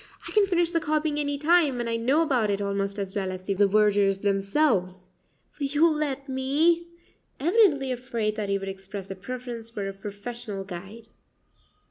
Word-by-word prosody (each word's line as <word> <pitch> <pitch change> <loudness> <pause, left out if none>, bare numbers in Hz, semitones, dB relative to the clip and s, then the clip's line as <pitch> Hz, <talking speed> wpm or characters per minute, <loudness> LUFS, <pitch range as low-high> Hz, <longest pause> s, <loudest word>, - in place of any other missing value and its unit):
"I - - -6
can 420 -2 +4
finish 345 -2 +2
the 335 - +2
copying 305 -1 0
any 285 -1 -1
time, 300 -3 +3
and 240 - -2
I 230 - -1
know 260 +8 +2
about 250 -9 +1
it 200 0 0
almost 200 0 -2
as 195 -1 -4
well 190 -2 -1
as 185 0 -7
the 195 - -1
vergers 200 0 +3
themselves 195 -3 0 0.5
will 280 - 0
you 295 +4 +4
let 295 -3 -1
me?" 295 +6 +2 0.5
evidently 300 - +3
afraid 235 -4 -2
that 210 -2 -3
he 200 - +2
would 195 0 -6
express 195 0 -7
a - - -4
preference 235 +3 -6
for 205 -4 -4
a 195 - -4
professional 205 +1 -6
guide. 195 +4 -9
230 Hz, 175 wpm, -26 LUFS, 195-290 Hz, 0.5 s, can